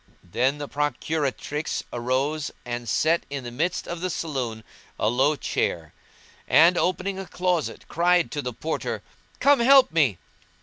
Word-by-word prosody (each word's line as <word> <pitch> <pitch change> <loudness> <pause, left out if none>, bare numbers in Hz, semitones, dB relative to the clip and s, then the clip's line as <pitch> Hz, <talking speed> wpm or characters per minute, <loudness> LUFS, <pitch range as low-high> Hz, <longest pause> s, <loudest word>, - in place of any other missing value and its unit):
Then 130 +11 0
the 145 -1 -5
procuratrix 150 +1 -2
rose 135 +5 -1 0.2
and 120 -1 -4
set 160 +9 +2
in 140 -2 -5
the 120 - -6
midst 165 +8 -1
of 175 -1 -5
the 185 - -1
saloon 130 -10 -3 0.4
a 105 - +2
low 135 +6 +2
chair 80 - -2 0.5
and, 170 +3 +6
opening 185 +2 -1
a 195 - -6
closet, 180 -3 -2
cried 175 0 +2
to 145 - -2
the 125 - -4
Porter, 155 +7 -4 0.4
"Come 285 -1 +5
help 265 +2 +6
me." 145 - +2
150 Hz, 145 wpm, -25 LUFS, 125-175 Hz, 0.5 s, and